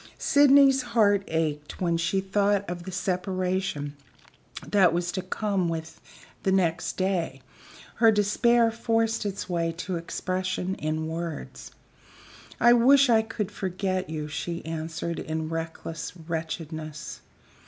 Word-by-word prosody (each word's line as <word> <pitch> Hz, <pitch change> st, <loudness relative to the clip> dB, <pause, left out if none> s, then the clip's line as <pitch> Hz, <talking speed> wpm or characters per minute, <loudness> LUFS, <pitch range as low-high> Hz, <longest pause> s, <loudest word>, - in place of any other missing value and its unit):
Sydney's 275 Hz, -1 st, +5 dB
heart 220 Hz, -5 st, +3 dB
ached 150 Hz, -2 st, -2 dB
when 170 Hz, -2 st, +1 dB
she 170 Hz, +3 st, 0 dB
thought 200 Hz, +1 st, +1 dB
of 175 Hz, 0 st, -5 dB
the 190 Hz, -, -6 dB
separation 180 Hz, -4 st, -2 dB, 0.7 s
that 190 Hz, -5 st, +4 dB
was 175 Hz, +1 st, -1 dB
to 185 Hz, -, -3 dB
come 190 Hz, -1 st, -1 dB
with 165 Hz, -1 st, -5 dB, 0.4 s
the 190 Hz, -, +1 dB
next 170 Hz, -3 st, +1 dB
day; 180 Hz, -8 st, -1 dB, 0.5 s
her 225 Hz, -1 st, +6 dB
despair 225 Hz, +3 st, +3 dB
forced 225 Hz, -1 st, 0 dB
its 200 Hz, -1 st, -4 dB
way 170 Hz, -2 st, 0 dB
to 180 Hz, +2 st, -4 dB
expression 185 Hz, +2 st, -2 dB
in 155 Hz, +1 st, -2 dB
words. 165 Hz, -1 st, -6 dB, 0.9 s
"I 240 Hz, 0 st, +7 dB
wish 265 Hz, +2 st, +6 dB
I 225 Hz, -1 st, +5 dB
could 220 Hz, -2 st, -4 dB
forget 185 Hz, -1 st, -2 dB
you," 155 Hz, -1 st, -4 dB
she 170 Hz, +3 st, -4 dB
answered, 160 Hz, +1 st, -4 dB
in 160 Hz, 0 st, -3 dB
reckless 165 Hz, 0 st, -5 dB
wretchedness. 160 Hz, -2 st, -5 dB
185 Hz, 125 wpm, -26 LUFS, 165-205 Hz, 0.9 s, I